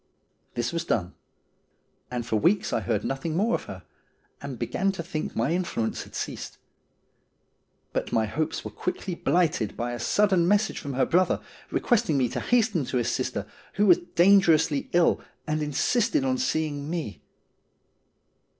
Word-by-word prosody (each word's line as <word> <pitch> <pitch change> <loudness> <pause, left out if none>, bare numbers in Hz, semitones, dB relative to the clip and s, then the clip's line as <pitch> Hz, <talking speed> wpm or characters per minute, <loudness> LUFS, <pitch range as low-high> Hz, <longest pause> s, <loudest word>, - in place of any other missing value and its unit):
This 120 +5 -1
was 170 0 -1
done, 90 - -1 1.0
and 120 -2 -3
for 115 -2 0
weeks 185 - +2
I - - +2
heard 110 -3 -1
nothing 145 +5 -2
more 225 +5 +2
of - - -1
her, - - -9 0.6
and - - -6
began 195 +1 0
to 170 - -5
think 160 -3 -4
my 115 +7 +1
influence 170 -11 -1
had - - -14
ceased. - - -5 1.4
But - - -2
my 110 -1 +2
hopes 150 +9 -2
were - - -5
quickly 180 0 -3
blighted 165 - +1
by 120 +2 -2
a 120 - -5
sudden 185 - +3
message 205 +2 +2
from 140 - -5
her 130 - +3
brother, 180 +2 +2 0.3
requesting 230 - +1
me 125 -3 +2
to - - -3
hasten 220 - +2
to 125 - -2
his 120 - 0
sister, - - -2 0.3
who 205 - +2
was 180 -4 +6 0.2
dangerously 170 -5 +4
ill, 175 -1 +3 0.2
and 155 0 -1
insisted 235 - +1
on 260 -1 +1
seeing 155 - -1
me. 160 -11 -4
165 Hz, 160 wpm, -26 LUFS, 135-195 Hz, 1.4 s, was